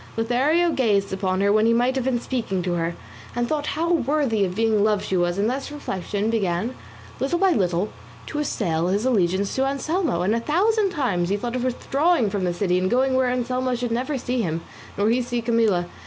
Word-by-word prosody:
Lothario 275 Hz, +10 st, +2 dB
gazed 205 Hz, -8 st, +1 dB
upon 190 Hz, -1 st, -1 dB
her 200 Hz, 0 st, +3 dB
when 215 Hz, +1 st, +4 dB
he 230 Hz, -, +4 dB
might 245 Hz, +2 st, +2 dB
have 260 Hz, -2 st, -1 dB
been 255 Hz, -2 st, +1 dB
speaking 230 Hz, -8 st, -2 dB
to 180 Hz, -1 st, -1 dB
her, 170 Hz, 0 st, -1 dB, 0.4 s
and 240 Hz, 0 st, 0 dB
thought 300 Hz, +1 st, -2 dB
how 335 Hz, +2 st, 0 dB
worthy 275 Hz, -7 st, +1 dB
of 180 Hz, -1 st, -2 dB
being 220 Hz, -1 st, +2 dB
loved 210 Hz, -1 st, +1 dB
she 190 Hz, -, -1 dB
was; 175 Hz, 0 st, +1 dB
and 205 Hz, +2 st, +1 dB
thus 265 Hz, +4 st, -3 dB
reflection 205 Hz, -6 st, -3 dB
began 205 Hz, +1 st, -1 dB, 0.5 s
little 275 Hz, +6 st, 0 dB
by 380 Hz, +1 st, +3 dB
little 185 Hz, -, +1 dB, 0.4 s
to 300 Hz, -, -4 dB
assail 175 Hz, -, -1 dB
his 200 Hz, +5 st, 0 dB
allegiance 195 Hz, -5 st, +1 dB
to 265 Hz, -, +1 dB
Anselmo, 280 Hz, -, 0 dB
and 200 Hz, +4 st, +2 dB
a 230 Hz, -, +1 dB
thousand 395 Hz, -, +2 dB
times 210 Hz, -, -1 dB
he 200 Hz, -, +1 dB
thought 240 Hz, +3 st, -4 dB
of 250 Hz, -, -2 dB
withdrawing 270 Hz, -, +1 dB
from 200 Hz, -3 st, -1 dB
the 175 Hz, -, +1 dB
city 180 Hz, -1 st, +1 dB
and 185 Hz, 0 st, 0 dB
going 260 Hz, +3 st, +2 dB
where 260 Hz, -1 st, +2 dB
Anselmo 250 Hz, +1 st, -1 dB
should 245 Hz, -1 st, -3 dB
never 260 Hz, +5 st, -1 dB
see 250 Hz, 0 st, -1 dB
him 165 Hz, -4 st, -2 dB, 0.4 s
nor 200 Hz, +1 st, +2 dB
he 250 Hz, +2 st, +2 dB
see 240 Hz, 0 st, -2 dB
Camilla. 225 Hz, -6 st, +2 dB
230 Hz, 215 wpm, -23 LUFS, 195-265 Hz, 0.5 s, when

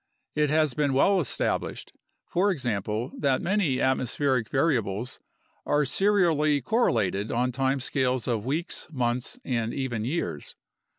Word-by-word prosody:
It 150 Hz, -1 st, +1 dB
has 155 Hz, -2 st, +2 dB
been 145 Hz, 0 st, +1 dB
well 190 Hz, +7 st, +4 dB
established, 140 Hz, -, -2 dB, 0.3 s
for 190 Hz, +4 st, +1 dB
example, 115 Hz, -, -2 dB
that 135 Hz, -2 st, +2 dB
many 190 Hz, -7 st, +1 dB
atmo 130 Hz, 0 st, +1 dB
spheric 130 Hz, -3 st, 0 dB
variables 125 Hz, -6 st, 0 dB, 0.4 s
are 145 Hz, 0 st, +2 dB
serially 160 Hz, -4 st, +2 dB
correlated 110 Hz, -, +1 dB
on 125 Hz, +2 st, +1 dB
time 135 Hz, +2 st, 0 dB
scales 130 Hz, -2 st, 0 dB
of 115 Hz, -4 st, 0 dB
weeks, 155 Hz, -, -3 dB
months, 125 Hz, -3 st, -2 dB
and 115 Hz, -2 st, -1 dB
even 125 Hz, -5 st, -2 dB
years. 125 Hz, -, -3 dB
130 Hz, 130 wpm, -26 LUFS, 120-150 Hz, 0.4 s, well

